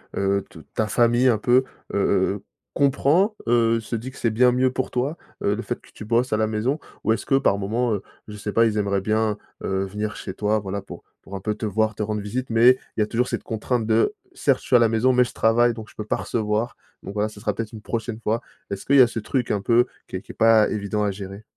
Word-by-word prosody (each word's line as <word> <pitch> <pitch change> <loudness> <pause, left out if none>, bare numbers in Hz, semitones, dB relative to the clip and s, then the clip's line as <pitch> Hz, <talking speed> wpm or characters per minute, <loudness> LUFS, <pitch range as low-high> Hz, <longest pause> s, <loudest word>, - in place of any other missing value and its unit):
heu - - -2 0.2
heu, - - -6
t - - -13 0.2
ta 110 - +1
famille, 120 +3 +3
un 115 - +3
peu, 125 +4 +3 0.3
heu - - 0
heu 95 -1 +2
heu, 100 - -10 0.3
comprend? 145 - +3
Heu, 115 -1 +3
se 115 +1 -5
dit 120 +4 -5
que - - -15
c'est 115 - +1
bien 125 +3 +4
mieux 130 +1 +2
pour 130 - -2
toi, 135 +6 -1 0.2
heu, 100 - +1
le 115 - -4
fait 120 - -4
que - - -21
tu - - -9
bosses 115 +3 +1
à 110 - +3
la 110 - +1
maison 110 +7 -1 0.3
ou 110 - +4
est-ce - - -4
que 135 - +2
par 100 - +2
moment, 110 +4 0
heu, 100 - -2 0.3
je 105 - -8
sais 105 0 -4
pas, 115 +2 +4
ils 110 -1 0
aimeraient 100 -1 +1
bien, 110 +1 0 0.3
heu, 95 0 -1
venir 105 +2 -4
chez - - -6
toi, 105 +2 +1
voilà, 100 0 -4
pour - - -11 0.2
pour 100 - -9
un - - -7
peu 105 +2 -2
te 110 - -4
voir, 110 +1 0
te 110 - -5
rendre 105 0 -2
visite 125 +6 -4
mais 115 +2 +6 0.3
il - - -2
y - - +5
a - - -3
toujours 120 +3 0
cette - - -3
contrainte 115 +1 -2
de, 115 - +2 0.2
certes 135 -3 +1
je - - -15
suis - - +3
à - - +8
la 115 -1 +4
maison 115 +3 +3
mais 125 0 +5
je 120 - -6
travaille 120 +2 +3
donc 110 -1 -8
je - - -18
peux 105 - -4
pas - - 0
recevoir, 110 +1 -1 0.3
donc 100 - -7
voilà, 105 +1 0
ça 105 - -13
sera - - 0
peut-être 115 -2 -5
une 110 - -8
prochaine 115 0 -4
fois. 115 +2 0 0.3
Est-ce 100 -1 -5
qu'il 140 - +3
y - - +9
a 125 - +7
ce 120 - -4
truc 125 +3 -2
un 100 - 0
peu 120 +4 +4 0.2
qui - - -7
est 95 - -3
qui - - -11
est - - -15
pas 110 -1 +5
évident 105 0 -2
à 105 - +1
gérer? 100 +1 -8
110 Hz, 280 wpm, -23 LUFS, 105-120 Hz, 0.3 s, y